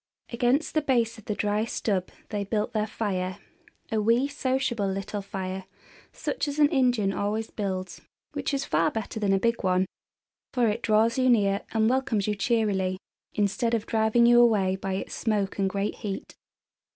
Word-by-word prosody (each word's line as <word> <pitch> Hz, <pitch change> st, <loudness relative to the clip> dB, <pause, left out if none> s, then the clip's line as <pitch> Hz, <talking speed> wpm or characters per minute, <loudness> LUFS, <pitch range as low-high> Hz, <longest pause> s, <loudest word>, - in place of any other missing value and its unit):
Against 245 Hz, +6 st, +1 dB
the 310 Hz, -, +2 dB
base 235 Hz, -5 st, +1 dB
of 220 Hz, -, -16 dB
the 210 Hz, -, -2 dB
dry 210 Hz, +1 st, 0 dB
stub 200 Hz, -4 st, -1 dB, 0.2 s
they 205 Hz, -1 st, -2 dB
built 210 Hz, +1 st, -1 dB
their 215 Hz, -1 st, 0 dB
fire, 190 Hz, -4 st, -2 dB, 0.5 s
a 220 Hz, -1 st, +1 dB
wee, 230 Hz, +5 st, +3 dB
sociable 260 Hz, -6 st, -1 dB
little 195 Hz, +2 st, -3 dB
fire 190 Hz, -1 st, -5 dB, 0.5 s
such -, -, -3 dB
as 285 Hz, 0 st, -3 dB
an 295 Hz, -1 st, +5 dB
Indian 245 Hz, -8 st, +2 dB
always 215 Hz, +3 st, -2 dB
builds, 190 Hz, -3 st, -4 dB, 0.3 s
which -, -, -2 dB
is 275 Hz, -1 st, -1 dB
far 160 Hz, +2 st, +2 dB
better 220 Hz, 0 st, -4 dB
than 205 Hz, -2 st, +1 dB
a 195 Hz, -, +4 dB
big 230 Hz, +4 st, 0 dB
one, 185 Hz, -1 st, +2 dB, 0.7 s
for 245 Hz, -3 st, +3 dB
it 215 Hz, +3 st, -2 dB
draws 225 Hz, +2 st, +3 dB
you 255 Hz, 0 st, +4 dB
near 200 Hz, -4 st, +3 dB
and 220 Hz, -1 st, +2 dB
welcomes 240 Hz, -5 st, +1 dB
you 210 Hz, -, +1 dB
cheerily, 200 Hz, -4 st, 0 dB, 0.4 s
instead 215 Hz, +3 st, +1 dB
of 220 Hz, -, -2 dB
driving 220 Hz, +1 st, +3 dB
you 240 Hz, 0 st, +7 dB
away 200 Hz, -6 st, +3 dB
by 190 Hz, 0 st, -4 dB
its 195 Hz, -, -5 dB
smoke 205 Hz, -4 st, -1 dB
and 195 Hz, -1 st, +2 dB
great 200 Hz, +2 st, -2 dB
heat. 200 Hz, -4 st, -5 dB
215 Hz, 175 wpm, -27 LUFS, 195-235 Hz, 0.7 s, you